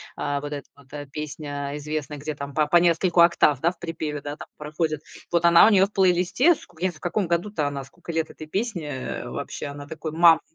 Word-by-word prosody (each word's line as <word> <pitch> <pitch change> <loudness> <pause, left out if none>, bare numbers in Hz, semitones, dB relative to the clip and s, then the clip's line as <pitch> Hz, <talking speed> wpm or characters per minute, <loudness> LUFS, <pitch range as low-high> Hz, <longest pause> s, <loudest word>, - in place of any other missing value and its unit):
а, 145 -1 -2
вот 145 0 -5
эта 145 -1 -6
вот, 140 -2 -20
эта 145 -2 -7
песня 145 -1 -5
известная, 150 0 -4
где 150 +2 -4
там 140 0 -7
по 155 +1 +2
по 175 - +5
нескольку 175 +1 +3
октав, 170 -5 +4
да, 170 +2 +3
в - - -19
припеве, 155 -3 -4
да, 145 +1 -6
там - - -9
проходит. 155 0 -2 0.3
Вот 170 -1 +2
она 170 +3 +8
у - - +6
нее 195 -1 +6
в 200 - -11
плейлисте, 190 - +3
в - - -15 0.2
я 185 +1 +1
в, 155 - -17
каком 180 +2 -1
году-то 170 -2 0
она, 140 -1 -4
сколько 170 +5 -10
лет 160 -1 -1
этой 155 - -10
песне, 195 -4 -3
э, 130 -2 -5
вообще. - - -5
Она 145 0 -8
такой 160 0 -6
мамонт, 165 0 +6
155 Hz, 230 wpm, -24 LUFS, 145-175 Hz, 0.3 s, она